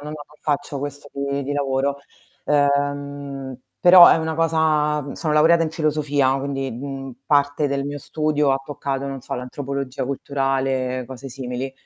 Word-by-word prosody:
no, 150 +1 -7
non - - -5 0.3
faccio 145 -1 -2
questo 145 +1 -6
di 140 0 -2
di 140 - -3
lavoro. 140 0 0 0.5
Ehm, 140 -2 -1 0.2
però 180 -1 +10
è - - +6
una 160 0 -2
cosa, 155 -2 +2
mhmm 140 0 -7
sono 155 -2 -2
laureata 165 +2 +5
in 155 - -3
filosofia, 145 -4 +1
quindi, 135 -1 -3
mhmm, 135 +2 -6
parte 145 0 +2
del 140 0 -1
mio 145 0 -4
studio 150 -1 0
ha 135 - 0
toccato, 140 -1 -3
non 135 -1 -5
so, - - -5
l'antropologia 135 +1 -4
culturale, 135 -1 -1
cose 130 +1 -8
simili. 130 0 -5
140 Hz, 155 wpm, -22 LUFS, 135-150 Hz, 0.5 s, però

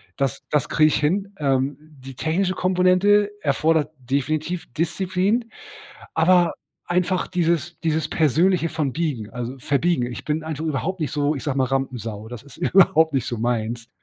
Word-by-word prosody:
das 135 -4 -2
das 150 - 0
krieg 155 - +4
ich 155 - +2
hin. 195 +7 0
Ähm, 135 -1 +1
die 140 -4 -13
technische 180 +7 0
Komponente 185 +3 +3
erfordert 155 +2 +1
definitiv 155 +7 -2
Disziplin, 190 - 0 0.6
aber 175 +1 +4 0.3
einfach 180 +1 0
dieses 170 -1 -1
dieses 160 -2 0
persönliche 165 +3 +2
von 155 -5 -2
biegen 140 -10 -3
also, 125 +1 -5
verbiegen. 140 +1 +1
Ich - - -8
bin 155 +1 -1
einfach 160 -1 -4
überhaupt 160 +5 -2
nicht 155 - -1
so, 150 -1 0
ich 135 - -6
sag 145 -3 -2
mal, 135 - +3
Rampensau, 125 -5 -3
das 120 -1 -8
ist 140 - -15
überhaupt 160 -3 +4
nicht 130 -4 +1
so 120 - -3
meins, 115 0 -2
155 Hz, 160 wpm, -22 LUFS, 135-175 Hz, 0.6 s, krieg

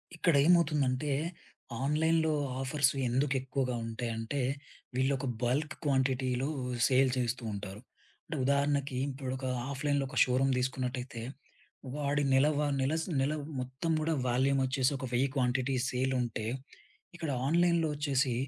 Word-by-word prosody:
ఇక్కడేమవుతుందంటే 150 -4 +3 0.7
ఆన్‌లైన్‌లో 160 +2 +2 0.3
ఆఫర్సు 140 +1 +2
ఎందుకెక్కువగా 130 0 0
ఉంటాయంటే, 115 +3 -3 0.5
వీళ్ళొక 130 +1 +1 0.2
బల్క్ 145 +6 0
క్వాంటిటీలో 130 -2 +1 0.4
సేల్ 130 0 +4
చేస్తూ 120 0 -1
ఉంటారు. 100 +1 -6 0.4
అంటే 155 - -5
ఉదాహరణకి 140 -1 +1
ఇప్పుడొక 130 -1 -4 0.3
ఆఫ్‌లైన్‌లో 140 0 0
ఒక - - -7
షోరూమ్ 130 +1 +2
తీసుకున్నట్టయితే 125 -1 -3 0.7
వాడి 145 0 0
నెలవా 145 +2 +3
నెల, 135 +3 +1 0.3
నెల 135 +3 +1 0.3
మొత్తం 130 +6 -3
కూడా 160 +1 +1 0.2
వాల్యూమ్ 135 +3 +2
వచ్చేసి 130 0 +1
ఒక 135 - -5
1000 125 +3 +3
క్వాంటిటీ 130 0 +1
సేలుంటే, 125 -4 -1 0.7
ఇక్కడ 165 -3 -4 0.2
ఆన్‌లైన్‌లో 170 0 +3
వచ్చేసి 140 -3 +1
135 Hz, 105 wpm, -31 LUFS, 130-145 Hz, 0.7 s, సేల్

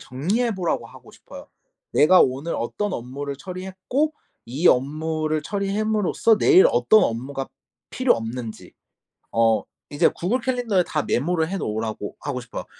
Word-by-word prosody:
정리해 200 - -1
보라고 175 -10 -2
하고 - - -15
싶어요. - - -13 0.5
내가 180 +5 +6
오늘 135 +6 +1
어떤 205 - -3
업무를 140 +1 -5
처리했고 190 - -3 0.3
이 140 +9 -1
업무를 155 +3 0
처리함으로써 210 +1 +1
내일 385 - +6
어떤 220 - +4
업무가 130 +4 -3 0.4
필요 255 -1 +2
없는지 115 0 -7 0.6
어 115 -1 +2 0.3
이제 145 - +3
구글 210 +9 -1
캘린더에 235 -7 +1
다 150 - -1
메모를 160 +4 0
해 195 - -2
놓으라고 110 - -4
하고 140 -3 -4
싶어요. 115 - -7
160 Hz, 325 characters per minute, -23 LUFS, 130-210 Hz, 0.6 s, 내가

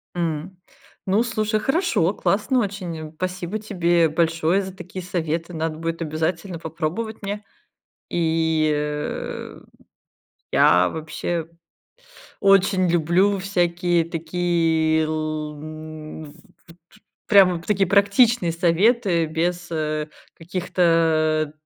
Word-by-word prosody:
М. 170 +1 -3 0.5
Ну, 200 +4 +2
слушай, 215 -2 -1
хорошо, 270 - +1
классно 215 +7 +1
очень, 180 -7 -4
спасибо 185 +3 -3
тебе 175 -5 +2
большое 165 +3 +1
за 190 -1 -7
такие 185 0 -8
советы, 165 -1 -3
надо 160 -1 -3
будет 165 +1 -4
обязательно 165 +3 -2
попробовать 170 +8 -4
мне, 205 +1 -4 0.7
и, 160 -2 +1
э, 150 0 -4 0.9
я 90 +1 +5
вообще 160 +1 -4 0.9
очень 195 -2 +4
люблю 175 +4 +2
всякие 175 -2 +1
такие, 165 -1 +1
л 155 -1 -3
м 155 0 -8
ф - - -10 0.4
т 165 - -15
т 175 +5 -25 0.3
прям 195 -3 +6
вот 165 - -10
такие 195 -3 +2
практичные 200 -1 +4
советы 175 +1 +2
без, 175 +3 -2
э, 155 -1 -2 0.3
каких-то, 165 -3 +1
170 Hz, 105 wpm, -22 LUFS, 160-190 Hz, 0.9 s, прям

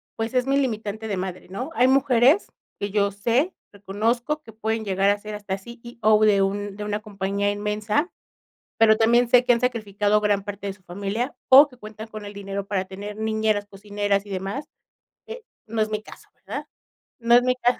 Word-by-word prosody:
pues, 225 +2 -3
es 255 0 +1
mi 275 - +2
limitante 220 -4 -2
de 200 -3 -2
madre", 185 0 -5
¿no? 250 +10 -5
Hay 250 +1 +4
mujeres 265 - +4 0.3
que 200 - -2
yo 200 -1 +2
sé, 235 - 0 0.2
reconozco 225 +9 -1
que 225 - -13
pueden 220 0 -2
llegar 195 0 +2
a 205 - +3
ser 210 0 -7
hasta 205 -2 -4
CEO 230 0 0
de 200 -2 +4
un 200 +1 -1
de 210 - -6
una 210 0 -2
compañía 200 -1 -2
inmensa, 210 - -1 0.7
pero 220 -1 +5
también 235 +2 +4
sé 250 0 +6
que 245 - +4
han 235 - -1
sacrificado 210 -3 +1
gran 205 -2 +1
parte 200 0 -6
de 195 - -3
su 190 - -23
familia 200 +8 -3
o 275 +3 +9
que 255 -3 -18
cuentan 215 0 -9
con 215 -1 -9
el 205 - -8
dinero 200 0 -5
para 190 -2 -1
tener 205 +2 -8
niñeras, 220 -1 0
cocineras 205 0 -2
y - - -13
demás. 195 +10 -4 0.6
Eh, 460 0 -8 0.2
no 220 0 -1
es 215 - 0
mi 215 0 -2
caso, - - -14
¿verdad? - - -7 0.5
No 235 0 +4
es 245 - +7
mi 250 0 +2
caso 250 0 +1
215 Hz, 200 wpm, -24 LUFS, 200-235 Hz, 0.7 s, o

